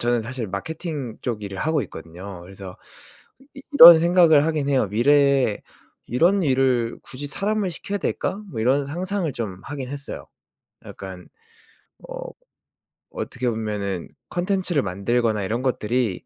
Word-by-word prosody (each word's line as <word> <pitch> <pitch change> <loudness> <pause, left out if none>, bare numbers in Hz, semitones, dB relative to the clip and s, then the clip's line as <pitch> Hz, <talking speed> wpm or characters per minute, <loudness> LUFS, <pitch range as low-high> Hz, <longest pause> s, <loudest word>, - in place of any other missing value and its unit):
저는 120 0 +1
사실 120 0 -5
마케팅 140 - -5
쪽 115 -4 -3
일을 100 -1 -6
하고 160 -1 +1
있거든요. 90 +1 -9
그래서 95 0 -10 0.8
이 275 - -11
이런 170 - +11
생각을 170 -3 +5
하기는 150 -3 -1
해요. 130 -6 +2
'미래에 135 0 +3 0.4
이런 175 - +2
일을 130 -4 +1
굳이 145 +3 -7
사람을 200 +3 -1
시켜야 200 +4 -4
될까?' 205 +2 -2
뭐 110 - -5
이런 135 +4 +2
상상을 180 +2 -2
좀 105 -6 -4
하기는 135 -2 -6
했어요. 140 -1 -7 0.6
약간 95 -2 -9 0.8
어 - - -8 1.0
어떻게 125 -2 -3
보면은 105 -5 -3 0.2
콘텐츠를 180 -4 0
만들거나 105 +3 0
이런 115 +6 -2
것들이 120 -4 -1
130 Hz, 305 characters per minute, -23 LUFS, 105-160 Hz, 1.0 s, 이런